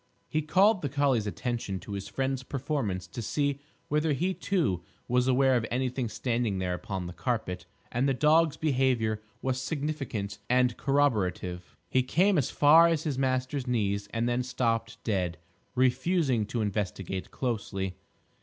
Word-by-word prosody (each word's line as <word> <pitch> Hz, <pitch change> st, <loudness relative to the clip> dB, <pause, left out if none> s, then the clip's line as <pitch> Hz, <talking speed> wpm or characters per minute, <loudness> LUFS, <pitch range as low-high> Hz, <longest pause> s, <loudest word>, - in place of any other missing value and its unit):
He 155 Hz, -, 0 dB
called 190 Hz, +6 st, +4 dB
the 145 Hz, -, -2 dB
collie's 135 Hz, -6 st, +1 dB
attention 110 Hz, -3 st, -3 dB
to 105 Hz, -, -9 dB
his 100 Hz, -1 st, -4 dB
friend's 135 Hz, -1 st, -1 dB
performance 130 Hz, -9 st, -2 dB
to 120 Hz, -, -7 dB
see 140 Hz, +4 st, 0 dB, 0.3 s
whether 150 Hz, +1 st, +1 dB
he 180 Hz, +7 st, 0 dB
too 160 Hz, -, 0 dB, 0.3 s
was 125 Hz, +1 st, +2 dB
aware 130 Hz, 0 st, +4 dB
of 120 Hz, -, +1 dB
anything 125 Hz, -1 st, -1 dB
standing 115 Hz, -3 st, -1 dB
there 90 Hz, -1 st, -1 dB
upon 95 Hz, 0 st, -4 dB
the 85 Hz, -, -6 dB
carpet, 90 Hz, -3 st, -3 dB, 0.2 s
and 130 Hz, +3 st, +1 dB
the 135 Hz, -, +1 dB
dog's 155 Hz, +2 st, +4 dB
behaviour 125 Hz, -7 st, +1 dB, 0.2 s
was 130 Hz, -1 st, 0 dB
significant 135 Hz, -9 st, -3 dB
and 125 Hz, -1 st, +3 dB
corroborative. 100 Hz, -10 st, 0 dB
He 130 Hz, -, +2 dB
came 180 Hz, +8 st, +3 dB
as 130 Hz, -, 0 dB
far 160 Hz, +3 st, +7 dB
as 165 Hz, -2 st, +1 dB
his 140 Hz, -5 st, -2 dB
master's 130 Hz, 0 st, 0 dB
knees 100 Hz, -4 st, 0 dB
and 115 Hz, +1 st, 0 dB
then 120 Hz, +1 st, +1 dB
stopped 115 Hz, -2 st, -1 dB
dead, 90 Hz, -6 st, -1 dB, 0.4 s
refusing 130 Hz, -, +2 dB
to 115 Hz, +1 st, -2 dB
investigate 95 Hz, -3 st, -3 dB
closely. 100 Hz, -6 st, -3 dB
125 Hz, 155 wpm, -29 LUFS, 105-140 Hz, 0.4 s, far